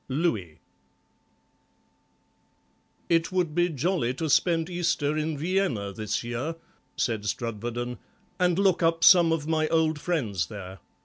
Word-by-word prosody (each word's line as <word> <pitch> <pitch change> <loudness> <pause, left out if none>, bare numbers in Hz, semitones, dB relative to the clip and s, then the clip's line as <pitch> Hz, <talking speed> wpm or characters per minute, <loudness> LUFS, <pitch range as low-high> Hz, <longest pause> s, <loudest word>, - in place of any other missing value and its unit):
LOUIS 120 - -1 2.5
"It 165 0 +1
would 180 -4 0
be 175 +2 +2
jolly 155 -4 -1
to 155 +2 -2
spend 165 0 +2
Easter 170 -4 0
in 155 0 -2
Vienna 155 - -1
this 110 +3 -3
year," 120 +7 -3 0.4
said 110 -4 -1
Strudwarden, 120 +2 -4 0.4
"and 180 -1 +2
look 195 -3 +3
up 165 0 +2
some 175 -3 +7
of 160 -2 -1
my 155 -1 +1
old 160 -1 +1
friends 110 - -1
there. 95 -2 -9
155 Hz, 125 wpm, -26 LUFS, 120-170 Hz, 2.5 s, some